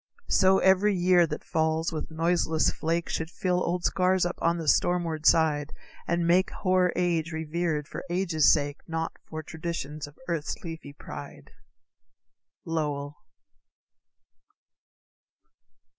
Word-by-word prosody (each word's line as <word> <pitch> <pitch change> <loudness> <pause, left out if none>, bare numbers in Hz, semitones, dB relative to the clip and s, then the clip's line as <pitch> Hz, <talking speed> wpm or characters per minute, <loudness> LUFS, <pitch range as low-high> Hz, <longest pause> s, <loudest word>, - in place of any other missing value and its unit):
So 190 0 +5
every 190 +2 +4
year 175 -1 +4
that 150 - -5
falls 160 +1 0
with 155 - -5
noiseless 165 0 +1
flake, 165 +1 -2
Should 160 0 -3
fill 180 +1 -1
old 175 +1 -1
scars 185 -1 +2
up 175 - -3
on 170 +1 +2
the 165 -2 -5
stormward 165 -2 +1
side, 155 -2 +3 0.3
And 170 0 +1
make 180 +2 +3
hoar 185 -2 +1
age 170 -2 0
revered 160 -1 -2
for - - -7
age's 170 -4 +3
sake, 145 -1 0
Not 165 -1 -3 0.2
for 155 0 -5
traditions 155 -2 -5
of 145 - -16
earth's 165 -4 -2
leafy 160 -4 -8
pride. 70 - -10 1.1
_Lowell. 145 -3 -2
165 Hz, 125 wpm, -27 LUFS, 155-175 Hz, 1.1 s, So